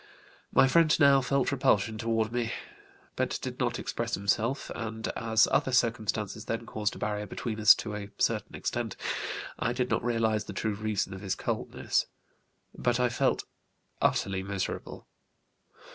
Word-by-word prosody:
My 135 - +6
friend 160 +3 +4
now 140 -2 +6
felt 135 0 +1
repulsion 110 -5 +2
toward 115 -1 0
me, 120 -1 -1 0.6
but - - 0
did - - -5
not - - 0
express - - -2
himself, 110 +7 0
and 110 -1 -4
as 115 -1 +3
other 130 - +2
circumstances 110 -4 0
then 115 +1 -3
caused 105 -1 -2
a - - -8
barrier 105 0 -2
between 110 +3 -4
us 110 +1 +9
to 105 - -5
a 100 -1 -5
certain - - 0
extent, - - -3 0.6
I 120 - 0
did 125 0 -1
not - - +1
realize 115 -3 +1
the - - -7
true 105 +2 -1
reason 105 -2 -2
of 95 - -8
his 95 -2 -1
coldness. - - -1 0.7
But 120 0 +1
I 125 0 +3
felt 115 - +1 0.6
utterly 95 -1 +1
miserable. 95 0 -4
110 Hz, 155 wpm, -29 LUFS, 105-120 Hz, 0.7 s, us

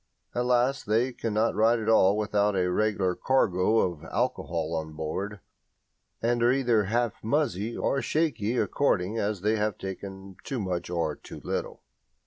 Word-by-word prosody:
At 120 0 -1
last 125 +1 +2
they 115 +4 +2
cannot 115 -1 0
ride 110 +3 +3
at 110 - -5
all 105 -3 +5
without 105 -1 +1
a 90 -1 +1
regular 100 -2 +1
cargo 110 -2 +2
of 85 -4 -2
alcohol 85 -1 -2
on 80 -1 -4
board, 90 +6 -4 0.8
and 120 0 +1
are 120 +1 +5
either 120 -5 +2
"half 115 +2 -1
muzzy" 115 - 0
or 135 - 0
shaky 125 -8 0
according 110 -7 +1
as 100 -3 -1
they 110 +2 +2
have 105 -1 -1
taken 95 0 -7
too 135 - -3
much 90 -4 -3
or 85 -4 -1
too - - -11
little. - - -4
105 Hz, 155 wpm, -27 LUFS, 95-120 Hz, 0.8 s, all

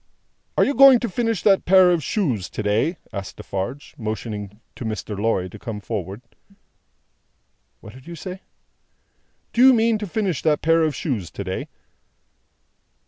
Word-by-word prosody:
"Are - - +5
you 280 - 0
going 270 -1 +8
to 240 - -1
finish 230 0 -1
that 195 -2 +4
pair 185 -1 +6
of 170 -4 0
shoes 130 - -1
to 105 - -5
day?" 115 - +1 0.2
asked 100 -1 -6
Defarge, 120 +9 -5
motioning 105 -2 -5 0.2
to - - -7
Mr. 110 -1 -4
Lorry 100 -3 0
to - - -12
come 110 -3 -6
forward. 100 +1 -5 1.6
"What 110 - -12
did 130 +3 -15
you 170 - -7
say?" 185 +2 -8 1.1
"Do 235 - +2
you 265 0 +8
mean 225 -1 +2
to 210 - -4
finish 185 - -1
that 155 -2 +1
pair 165 +1 +4
of 155 -2 +1
shoes 110 - -3
to - - -6
day?" - - -4
145 Hz, 160 wpm, -22 LUFS, -, 1.6 s, going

